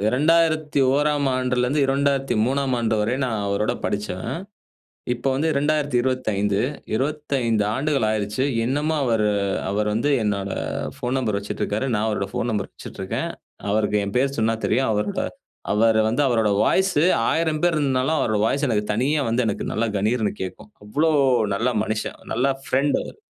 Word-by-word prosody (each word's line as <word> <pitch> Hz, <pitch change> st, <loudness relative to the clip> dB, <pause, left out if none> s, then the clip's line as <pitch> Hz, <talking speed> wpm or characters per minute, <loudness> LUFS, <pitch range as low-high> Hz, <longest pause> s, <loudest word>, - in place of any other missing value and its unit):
2001ஆம் 150 Hz, -2 st, +2 dB
ஆண்டில 125 Hz, -1 st, 0 dB
இருந்து 145 Hz, +3 st, +1 dB
2003ஆம் 135 Hz, -1 st, +1 dB
ஆண்டு 110 Hz, -1 st, +1 dB
வரை 115 Hz, +4 st, 0 dB
நான் 110 Hz, -4 st, -2 dB
அவரோட 100 Hz, +2 st, 0 dB
படிச்சவன். 105 Hz, -, -3 dB, 0.8 s
இப்பது 130 Hz, +2 st, -1 dB
வந்து 155 Hz, +4 st, +1 dB
2025, 130 Hz, -8 st, +1 dB, 0.3 s
25 135 Hz, -5 st, 0 dB
ஆண்டுகள் 140 Hz, -3 st, +1 dB
ஆயிடுச்சு. 105 Hz, +4 st, -1 dB, 0.2 s
இன்னமும் 150 Hz, +5 st, 0 dB
அவர் 115 Hz, -5 st, +2 dB, 0.4 s
அவர் 105 Hz, +1 st, 0 dB
வந்து 145 Hz, +7 st, +1 dB
என்னோட 100 Hz, -2 st, -1 dB, 0.5 s
போன் 125 Hz, +2 st, -1 dB
நம்பர் 110 Hz, -6 st, -1 dB
வச்சிட்டு 100 Hz, -, -5 dB
இருக்கிறாரு. 110 Hz, +6 st, -1 dB
நான் 105 Hz, +1 st, 0 dB
அவரோட 100 Hz, -2 st, -2 dB
போன் 120 Hz, -, -1 dB
நம்பர் 105 Hz, -3 st, -2 dB
வைச்சிட்டு -, -, -10 dB
இருக்கேன். -, -, -3 dB, 0.4 s
அவருக்கு 105 Hz, 0 st, +1 dB
என் 100 Hz, -, -5 dB
பெயர் 135 Hz, +2 st, +1 dB
சொன்னா 115 Hz, +1 st, +2 dB
தெரியும். 130 Hz, 0 st, +1 dB
அவருடைய 105 Hz, -1 st, -1 dB, 0.5 s
அவர் 110 Hz, +1 st, +3 dB
வந்து 120 Hz, +6 st, +1 dB
அவருடைய 110 Hz, -4 st, +2 dB
வாய்ஸ் 190 Hz, 0 st, +2 dB, 0.4 s
1000 160 Hz, -2 st, 0 dB
பேர் 175 Hz, -2 st, +3 dB
இருந்தாலும் 135 Hz, +1 st, +1 dB
அவருடைய 110 Hz, -4 st, +1 dB
வாய்ஸ் 140 Hz, +5 st, 0 dB
எனக்கு 105 Hz, -3 st, +1 dB
தனியா 145 Hz, +6 st, +1 dB
வந்து 120 Hz, +2 st, +1 dB
எனக்கு 105 Hz, -, -2 dB
நல்லா 115 Hz, +2 st, 0 dB
கனீர்னு 110 Hz, +2 st, +1 dB
கேட்கும். 95 Hz, +3 st, -7 dB
அவ்வளவு 150 Hz, +6 st, +2 dB, 0.3 s
நல்ல 115 Hz, +5 st, 0 dB
மனுஷன், 110 Hz, 0 st, -3 dB
நல்ல 125 Hz, +4 st, +1 dB, 0.2 s
ஃபிரெண்ட் 140 Hz, +2 st, +1 dB
அவரு. -, -, -10 dB
125 Hz, 150 wpm, -23 LUFS, 105-140 Hz, 0.8 s, அவர்